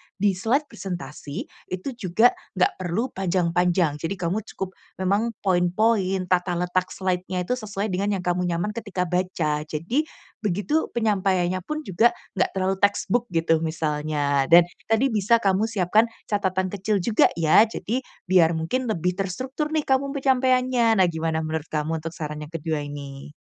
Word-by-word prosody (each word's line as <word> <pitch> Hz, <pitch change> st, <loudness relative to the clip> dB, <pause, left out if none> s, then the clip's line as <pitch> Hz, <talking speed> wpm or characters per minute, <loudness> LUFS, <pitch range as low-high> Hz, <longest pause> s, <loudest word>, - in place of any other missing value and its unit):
di-slide 205 Hz, +8 st, +1 dB
presentasi, 175 Hz, -, -6 dB, 0.2 s
itu 185 Hz, +7 st, -4 dB
juga 230 Hz, 0 st, +3 dB, 0.2 s
nggak 185 Hz, -, +1 dB
perlu 185 Hz, +8 st, -2 dB
panjang-panjang, 175 Hz, -3 st, +1 dB
jadi 165 Hz, +4 st, -3 dB
kamu 180 Hz, +2 st, -1 dB, 0.2 s
cukup 190 Hz, -1 st, -4 dB, 0.2 s
memang 200 Hz, +4 st, 0 dB
poin-poin, 190 Hz, +1 st, +2 dB
tata 180 Hz, 0 st, +2 dB
letak 180 Hz, +1 st, 0 dB
slide-nya 185 Hz, -1 st, -1 dB
itu -, -, -6 dB
sesuai 210 Hz, -1 st, -3 dB
dengan 200 Hz, +3 st, 0 dB
yang 180 Hz, -, -4 dB
kamu 180 Hz, 0 st, 0 dB
nyaman 175 Hz, +4 st, -1 dB
ketika 205 Hz, -5 st, -3 dB
baca. 170 Hz, -4 st, -1 dB
Jadi, 210 Hz, -, -1 dB, 0.3 s
begitu 210 Hz, -, 0 dB
penyampaiannya 190 Hz, -5 st, +1 dB
pun 305 Hz, -, -5 dB
juga 220 Hz, +4 st, +3 dB, 0.2 s
nggak -, -, +3 dB
terlalu 190 Hz, 0 st, +1 dB
textbook 215 Hz, +4 st, +1 dB
gitu, 165 Hz, -1 st, +3 dB
misalnya 150 Hz, -3 st, 0 dB
dan 170 Hz, +1 st, +8 dB, 0.2 s
tadi 225 Hz, +4 st, +2 dB
bisa 220 Hz, +2 st, +2 dB
kamu 195 Hz, +3 st, +2 dB
siapkan 215 Hz, +1 st, +2 dB, 0.2 s
catatan 190 Hz, -3 st, -1 dB
kecil 200 Hz, -1 st, -1 dB
juga 220 Hz, 0 st, +4 dB
ya, 170 Hz, +7 st, +5 dB
jadi 225 Hz, +2 st, -3 dB, 0.3 s
biar 170 Hz, -3 st, +5 dB
mungkin 240 Hz, +11 st, -1 dB
lebih 180 Hz, -4 st, 0 dB
terstruktur 260 Hz, -, -2 dB
nih 310 Hz, -, +2 dB
kamu 275 Hz, +1 st, 0 dB
penyampaiannya. 255 Hz, -5 st, +3 dB
Nah 180 Hz, -, +4 dB
gimana 160 Hz, 0 st, -1 dB
menurut 155 Hz, 0 st, -3 dB
kamu 155 Hz, +1 st, -2 dB
untuk 165 Hz, +1 st, -7 dB
saran 150 Hz, -1 st, -5 dB
yang 165 Hz, -, -20 dB
kedua 160 Hz, -1 st, -2 dB
ini? 145 Hz, -1 st, -8 dB
185 Hz, 150 wpm, -24 LUFS, 170-220 Hz, 0.3 s, dan